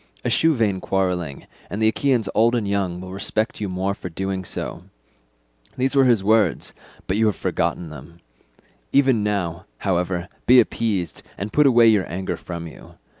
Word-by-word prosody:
Eschew 160 -1 +3
vain 105 -6 0
quarrelling, 90 -7 -2 0.2
and 100 - -4
the 110 - +3
Achaeans 120 -1 +1
old 115 +2 +3
and 110 -4 -1
young 95 -3 -1
will 95 0 -8
respect 110 +3 -2
you 105 - -2
more 95 +2 -1
for 90 - -7
doing 95 +2 -3
so.' - - -6 0.9
These 130 +2 +1
were 135 -1 +5
his 115 -6 +3
words, 105 -5 +2 0.3
but 95 - -1
you 110 0 +3
have 105 - +1
forgotten 85 -3 -2
them. 75 +4 -12 0.7
Even 135 -5 +4
now, 95 -4 -2
however, 90 -2 -1 0.2
be 125 +1 +8
appeased, 110 -6 -1 0.2
and 100 +2 -5
put 150 -1 +5
away 120 -3 +6
your 105 -6 +3
anger 95 +2 -3
from 85 -1 -7
you. 80 - -12
100 Hz, 170 wpm, -22 LUFS, 90-115 Hz, 0.9 s, be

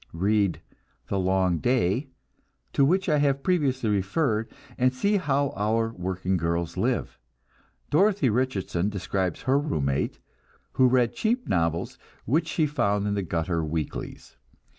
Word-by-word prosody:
Read 100 +2 +1 0.5
"The 100 - 0
Long 95 -2 +1
Day," 125 - +1 0.6
to 140 - +3
which 185 +7 +2
I 150 -3 +3
have 140 -1 +1
previously 135 - +1
referred, 110 - 0 0.3
and 130 0 +2
see 200 +12 +1
how 140 -5 0
our 115 +2 0
working 95 0 -2
girls 85 0 -2
live. - - -1 0.7
Dorothy 195 -1 +3
Richardson 105 -6 0
describes 95 -3 -2
her 135 +2 +3
room 110 - -1
mate, 70 +1 -1 0.5
who 130 - +4
read 125 -2 +2
cheap 240 +3 -1
novels 85 -1 -1 0.3
which 150 +9 +1
she 160 - +1
found 105 -9 0
in 105 - 0
the 100 - 0
gutter 85 -1 -1
weeklies. 80 -1 -5
105 Hz, 140 wpm, -26 LUFS, 90-140 Hz, 0.7 s, who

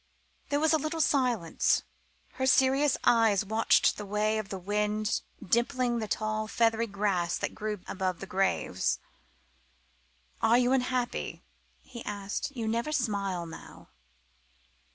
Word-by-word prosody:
There 285 - +1
was 315 +1 +3
a 315 - +4
little 310 +2 -3
silence. 250 - +2 0.5
Her 260 0 -2
serious 265 +2 +4
eyes 225 -4 +4
watched 220 +3 +3
the 210 - -6
way 215 +2 +1
of 205 -2 -6
the 195 - -4
wind 210 +3 -1 0.3
dimpling 240 +2 +1
the 215 - -3
tall, 215 +1 -2
feathery 225 0 +1
grass 195 -4 0
that - - -3
grew 210 -2 -4
above 185 -2 -2
the - - -6
graves. 195 +1 0 1.4
"Are 225 +2 +5
you 250 0 +3
unhappy?" 250 -2 -1 0.4
he 240 -3 -10
asked; 200 +3 -4
"you 225 -2 -2
never 235 +6 -1
smile 200 - -1
now." 165 - -12
220 Hz, 130 wpm, -29 LUFS, 200-250 Hz, 1.4 s, Are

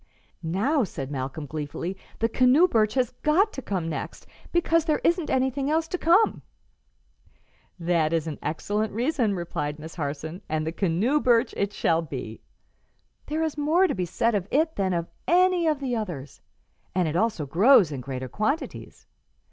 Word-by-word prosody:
"Now," 210 - +1
said 140 -8 -5
Malcolm, 135 +2 -4
gleefully, 155 +5 -5 0.2
"the 225 - +1
canoe 255 +9 +4
birch 215 - +1
has 255 -2 +1
got 375 +8 +3
to 270 - -5
come 185 -8 -3
next, 160 - -5 0.3
because 330 -1 +2
there 310 -3 +1
isn't 340 -2 +1
anything 265 +2 0
else 320 +1 +1
to 365 - -3
come." 360 +7 +3 1.4
"That 165 -3 +1
is 165 -2 0
an 155 -3 -5
excellent 205 +7 -2
reason," 235 -3 0
replied 150 -4 -3
Miss 160 +1 -9
Harson, 155 +4 -5
"and 155 0 -1
the 160 - -2
canoe 195 - +1
birch 240 -2 +3
it 200 0 -1
shall 165 -4 +1
be. 130 -8 -7 0.9
There 315 +2 -1
is 310 -2 -2
more 320 +6 +3
to - - 0
be 185 -2 -2
said 230 +7 0
of 200 -3 -1
it 315 +3 +1
than 190 -2 0
of 170 -1 -1 0.2
any 360 0 +4
of 305 -3 +1
the 260 -3 -2
others, 175 - -5 0.5
and 180 -3 +2
it 155 - -2
also 210 -5 0
grows 185 - +5
in 135 -3 -4
greater 130 0 -5
quantities. 265 - -3
205 Hz, 170 wpm, -26 LUFS, -, 1.4 s, grows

